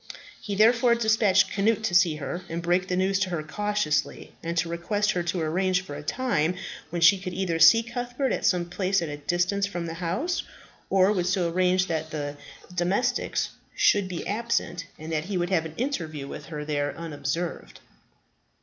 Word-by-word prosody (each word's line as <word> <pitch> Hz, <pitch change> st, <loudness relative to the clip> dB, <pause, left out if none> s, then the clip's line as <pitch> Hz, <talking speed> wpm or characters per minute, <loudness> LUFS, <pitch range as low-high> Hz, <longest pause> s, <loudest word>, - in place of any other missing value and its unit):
He 205 Hz, -2 st, -4 dB
therefore 235 Hz, +3 st, +5 dB
despatched 215 Hz, -4 st, +3 dB
Cnut 220 Hz, +2 st, +1 dB
to 220 Hz, -, -1 dB
see 175 Hz, -3 st, +5 dB
her, 150 Hz, +4 st, -5 dB
and 165 Hz, -, -3 dB
break 180 Hz, +2 st, +1 dB
the 180 Hz, -, -1 dB
news 190 Hz, +1 st, +2 dB
to 190 Hz, -1 st, 0 dB
her 170 Hz, -4 st, -2 dB
cautiously, 155 Hz, -4 st, -1 dB
and 170 Hz, +1 st, -4 dB
to 165 Hz, +1 st, +1 dB
request 205 Hz, +5 st, 0 dB
her 180 Hz, -, -1 dB
to 175 Hz, +1 st, -2 dB
arrange 180 Hz, +3 st, +1 dB
for 145 Hz, -, -8 dB
a 145 Hz, -, -6 dB
time 180 Hz, -, 0 dB, 0.3 s
when 170 Hz, +1 st, -2 dB
she 185 Hz, +2 st, +6 dB
would 180 Hz, -, -5 dB
either 175 Hz, -3 st, -1 dB
see 225 Hz, +8 st, +8 dB
Cuthbert 245 Hz, +3 st, -3 dB
at -, -, -3 dB
some 180 Hz, -2 st, +2 dB
place 185 Hz, +1 st, 0 dB
at 165 Hz, -, -4 dB
a 145 Hz, -, -5 dB
distance 180 Hz, +6 st, 0 dB
from 175 Hz, -4 st, -4 dB
the 165 Hz, -, -4 dB
house, 190 Hz, -, -2 dB, 0.5 s
or 195 Hz, +1 st, +4 dB
would 180 Hz, -4 st, 0 dB
so 180 Hz, -2 st, +1 dB
arrange 185 Hz, +1 st, +2 dB
that 160 Hz, -3 st, -3 dB
the 145 Hz, -2 st, -4 dB, 0.4 s
domestics 195 Hz, +8 st, 0 dB, 0.3 s
should 205 Hz, -2 st, +3 dB
be 180 Hz, -2 st, -5 dB
absent 210 Hz, -6 st, -2 dB
and 155 Hz, +1 st, -8 dB
that 155 Hz, 0 st, -1 dB
he 195 Hz, 0 st, -2 dB
would 175 Hz, +1 st, -1 dB
have 165 Hz, -4 st, +2 dB
an 160 Hz, -, -13 dB
interview 160 Hz, -, -3 dB
with -, -, -8 dB
her 150 Hz, -2 st, -5 dB
there 145 Hz, -1 st, -2 dB
unobserved. 165 Hz, +1 st, -4 dB
180 Hz, 190 wpm, -26 LUFS, 165-205 Hz, 0.5 s, see